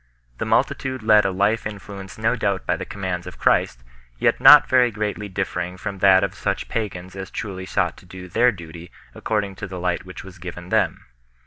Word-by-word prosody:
The - - -2
multitude 130 -3 0
led 105 -1 +5
a 95 - +1
life 100 +4 +1
influenced 100 -1 -9
no 110 +3 +1
doubt 100 -5 -1
by - - +1
the - - -6
commands 90 -3 -4
of - - -9
Christ, - - +1 0.3
yet - - +2
not 150 -1 +9
very 125 -1 +4
greatly 105 -1 -4
differing 90 -1 -3
from 100 +1 -6
that 95 0 +6
of 100 - -1
such - - -3
pagans 95 -5 -4
as 95 -1 -6
truly 95 -3 -6
sought 90 -2 -1
to 90 - -17
do 90 0 -10
their 120 +7 +3
duty 85 -3 -11 0.2
according 105 -3 -2
to - - -6
the 95 -1 -7
light 90 0 -1
which 95 0 -10
was 95 -1 -13
given 90 0 -8
them. - - 0
95 Hz, 200 wpm, -22 LUFS, 90-105 Hz, 0.3 s, not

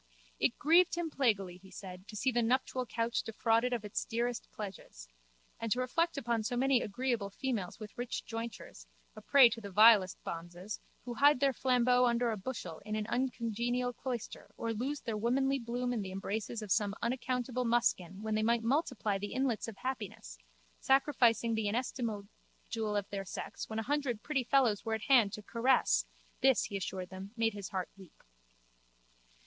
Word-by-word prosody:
It - - +1
grieved 340 +4 +5
him 340 -2 -2
plaguily, 200 -10 +1
he 190 +1 -16
said, 185 0 -9
to 225 - -9
see 250 +5 +1
the 240 0 +2
nuptial 255 +1 0
couch 230 +1 -1
defrauded 225 +2 +1
of 235 -4 -2
its 205 - -2
dearest 235 +1 -2
pledges: 190 - -8 0.5
and 230 -1 -3
to 245 - +2
reflect 330 +6 0
upon 235 -4 0
so 245 +3 -2
many 265 -1 +3
agreeable 230 -1 -1
females 220 -4 -3
with 215 -2 -9
rich 245 0 -4
jointures, 225 - -7 0.3
a - - -10
prey 275 -3 +7
to 230 0 -5
the 200 - -7
vilest 205 -1 +6
bonzes, 175 +4 -6 0.3
who 245 - -4
hide 285 +2 +5
their 275 0 +3
flambeau 250 -1 +3
under 235 0 +1
a - - -1
bushel 190 -6 -6
in 215 +1 -3
an 215 -1 -1
uncongenial 245 0 -1
cloister 245 -2 -5
or 230 0 -2
lose 270 +6 -3
their 225 - -3
womanly 270 +5 +1
bloom 245 +1 -2
in 230 - -1
the 190 -1 -5
embraces 210 +3 -3
of 205 - -7
some 205 -1 +2
unaccountable 250 +1 -1
muskin 225 -5 +1
when 220 0 -1
they 215 - +1
might 230 +1 +2
multiply 235 -6 0
the 205 +1 -5
inlets 255 -3 0
of 220 -4 -8
happiness, 205 - -5 0.4
sacrificing 245 -4 +3
the 220 -1 0
inestimable 225 -2 -2 0.4
jewel 220 -2 -1
of 200 -1 -1
their 195 -1 -3
sex 185 - -6
when 220 - -4
a 225 - -1
hundred 270 -4 -1
pretty 280 -4 0
fellows 245 -5 +3
were 225 -1 -1
at 220 - -6
hand 240 -7 +5
to 210 - -7
caress, 245 +4 +2 0.3
this, 265 -1 +5
he 200 - -3
assured 185 -1 -4
them, 190 +2 -8
made 225 -1 +2
his 200 -2 -6
heart 185 -2 -3
weep. 190 -4 -16
230 Hz, 180 wpm, -33 LUFS, 205-250 Hz, 0.5 s, prey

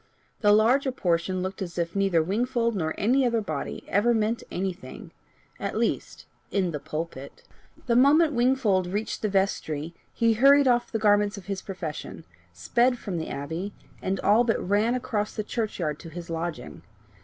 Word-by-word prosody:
The 205 -2 +4
larger 245 +6 +4
portion 180 -4 0
looked 190 +1 -5
as 175 -2 -5
if 170 +1 -2
neither 195 -5 +2
Wingfold 235 +5 0
nor 160 -4 -2
any 255 +6 +3
other 235 -2 +2
body 155 -9 -4
ever 230 +4 +2
meant 220 +1 0
anything 190 0 -5 0.5
at - - -3
least - - -2 0.2
in 190 -3 0
the 150 - -4
pulpit. 155 -3 -6 0.4
The 235 - +1
moment 295 +5 +5
Wingfold 240 -7 +2
reached 205 +4 -3
the 215 - 0
vestry, 170 -5 -1 0.2
he 230 -1 +2
hurried 275 +4 +6
off 240 -1 +2
the 225 - 0
garments 205 -1 +3
of 200 - -10
his 195 -2 -4
profession, 175 -6 -6 0.3
sped 245 +1 +1
from 190 -7 -4
the 160 - -5
Abbey, 160 +8 -4 0.3
and 190 0 -1
all 215 +4 +4
but 230 -2 +1
ran 210 +5 +2
across 215 -4 -2
the 215 - -2
church 220 0 -3
yard 150 -4 -2
to 165 - -10
his 170 +1 -8
lodging. 165 -5 -5
205 Hz, 170 wpm, -26 LUFS, 175-235 Hz, 0.5 s, hurried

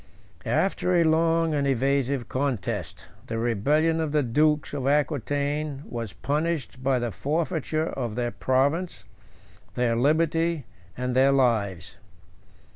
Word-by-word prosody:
After 180 +8 +1
a - - +5
long 165 0 +2
and 140 -1 +1
evasive 135 -1 0
contest, 130 -6 -3 0.2
the 115 - -3
rebellion 145 +9 +1
of 155 -2 -2
the 150 -1 +3
dukes 150 +5 +1
of 135 -2 -2
Aquitain 145 0 0
was 115 -4 -5
punished 150 - -2
by 130 0 +2
the 120 -2 -2
forfeiture 155 - -1
of 120 -5 -4
their 120 -1 -1
province, 145 +7 0 0.7
their 120 -2 +1
liberty, 160 +3 +1 0.3
and 125 0 -2
their 135 +1 +5
lives. 110 -9 0
140 Hz, 120 wpm, -26 LUFS, 125-155 Hz, 0.7 s, a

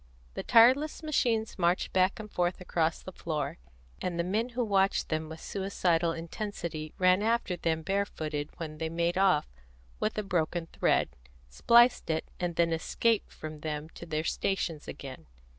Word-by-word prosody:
The - - -4
tireless 260 +8 +5
machines 230 -9 0
marched 175 +1 +1
back 185 +2 +2
and 215 - -6
forth 175 0 0
across 165 -3 -1
the 185 - -7
floor, 155 -3 -3 0.4
and 175 -2 -2
the 170 - +1
men 215 +7 0
who 245 0 -1
watched 195 -2 +2
them 155 0 -2
with 160 0 -8
suicidal 175 -4 0
intensity 165 -2 -5
ran 185 +1 +4
after 225 -4 +1
them 160 -2 -1
barefooted 155 -6 -2
when 155 -2 -6
they 160 -1 -2
made 170 +1 0
off 190 -5 +3 0.5
with 215 - -1
a 215 - 0
broken 175 -2 -1
thread, - - +1 0.4
spliced 235 - +4
it, 160 0 0
and 175 -1 -2
then 165 0 +2
escaped 220 +7 0
from 155 -1 -8
them 150 0 -4
to 170 - -11
their 155 -1 -1
stations 165 -3 -2
again. 130 - -8
175 Hz, 160 wpm, -30 LUFS, 160-200 Hz, 0.5 s, tireless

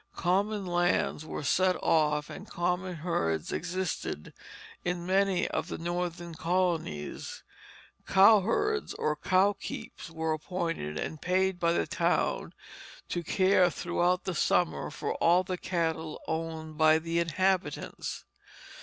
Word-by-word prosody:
Common 195 +3 0
lands 175 -3 +1
were 155 - -5
set 185 +6 +3
off 150 -2 +2
and 195 - -9
common 180 +1 -1
herds 85 - -1
existed 180 - -3 0.5
in 175 -1 -2
many 190 0 +2
of - - -2
the - - -5
Northern 175 0 -3
colonies; 165 - -2 0.6
cowherds 225 - +4
or 150 0 0
"cow 185 +6 +3
keeps" 190 -2 -8
were 160 -1 -1
appointed 160 - -3
and 155 - -4
paid 185 0 +1
by 170 -1 +2
the - - +1
town - - 0 0.5
to 175 - -1
care 185 +1 +3
throughout 175 +2 0
the 190 - -2
summer 175 +1 +1
for - - -3
all 175 +2 +4
the 185 -1 -4
cattle 160 -3 -2
owned 160 -1 -4
by 155 0 +6
the 165 +1 -1
inhabitants. 185 +3 -1
175 Hz, 125 wpm, -29 LUFS, 160-185 Hz, 0.6 s, by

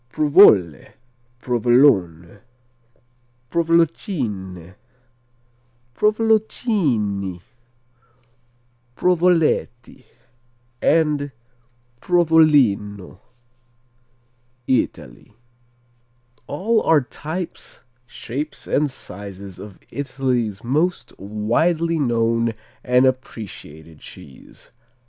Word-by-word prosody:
Provole, 115 - +4 0.5
Provolone, 120 - +2 1.1
Provolocine, 145 - -1 1.2
Provoloncinni, 200 - 0 1.6
Provoletti, 165 -8 0 0.8
and 150 -3 +1 0.7
Provolino 140 - +2 1.5
Italy 105 - -3 1.1
All 215 +10 0
are 160 -2 +3
types, 160 +7 -7 0.3
shapes 140 +7 -6
and 150 +1 0
sizes 100 -5 -10
of 100 -3 -11
Italy's 125 -6 -2
most 155 +9 -1
widely 155 - 0
known 115 -3 0 0.3
and 125 +1 +3
appreciated 90 - -5
cheese. 65 - -14
130 Hz, 55 wpm, -20 LUFS, 100-160 Hz, 1.6 s, Provole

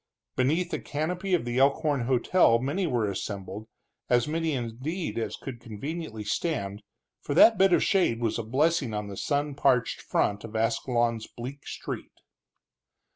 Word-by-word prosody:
Beneath 160 +8 +1
the - - -1
canopy 180 +5 -1
of 165 - -2
the 120 +1 -1
Elkhorn 140 -1 +2
hotel 130 0 +4
many 145 +10 -1
were 120 -7 +1
assembled, 100 +1 -5 0.4
as 120 0 +3
many 160 0 -1
indeed, 130 +6 -3
as 110 -2 -3
could 130 -3 -7
conveniently 120 +1 -6
stand, 105 - -2 0.4
for 145 - -3
that 225 +4 +7
bit 195 0 +5
of - - +4
shade 180 - +2
was 115 -1 -1
a - - -2
blessing 135 0 +1
on 105 -1 -3
the 100 - -6
sun 145 +5 -1
parched 125 -3 +2
front 100 -1 0
of 115 -1 -9
Ascalon's 115 0 0
bleak 130 +4 -8
street. - - -6
125 Hz, 155 wpm, -27 LUFS, 115-155 Hz, 0.4 s, that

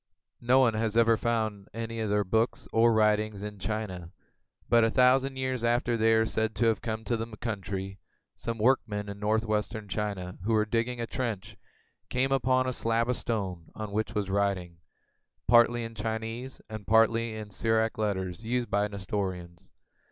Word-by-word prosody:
No 125 +2 +4
one 130 -4 +5
has 110 0 -1
ever 115 -1 +5
found 110 -3 -1
any 115 0 -4
of 110 -2 -1
their 105 0 +2
books 110 +5 0
or 115 +1 +5
writings 105 -2 +2
in 105 -1 -6
China; 95 -5 -4 0.6
but 115 -1 +5
a 115 - +4
thousand 130 +3 +3
years 130 -2 -2
after 120 0 +2
they 115 0 +3
are 110 0 +4
said 110 0 -1
to 120 - +1
have 115 -3 +2
come 110 -1 -3
to 120 - 0
the 115 -1 -5
country, 95 -3 -4 0.4
some 115 -1 -4
workmen 110 -3 +1
in 100 0 -7
northwestern 110 0 -1
China 100 -3 -4
who 115 +3 0
were 110 -1 +3
digging 115 +3 -1
a 115 - -1
trench 115 -5 -4 0.5
came 130 +2 0
upon 130 -1 +2
a 130 - -1
slab 115 +1 0
of 125 - +2
stone 95 -9 -3
on 110 -2 -5
which 110 +2 -2
was 100 -2 -1
writing, 95 -4 -1 0.7
partly 120 0 +5
in 115 0 -6
Chinese 115 +3 -4
and 110 -2 -8
partly 115 +1 +3
in 110 -1 -7
the - - -13
Syriac 110 0 +1
letters 95 -2 -2
used 120 +1 -1
by 100 - +2
the 105 - 0
Nestorians. 95 -3 -5
110 Hz, 180 wpm, -29 LUFS, 105-115 Hz, 0.7 s, one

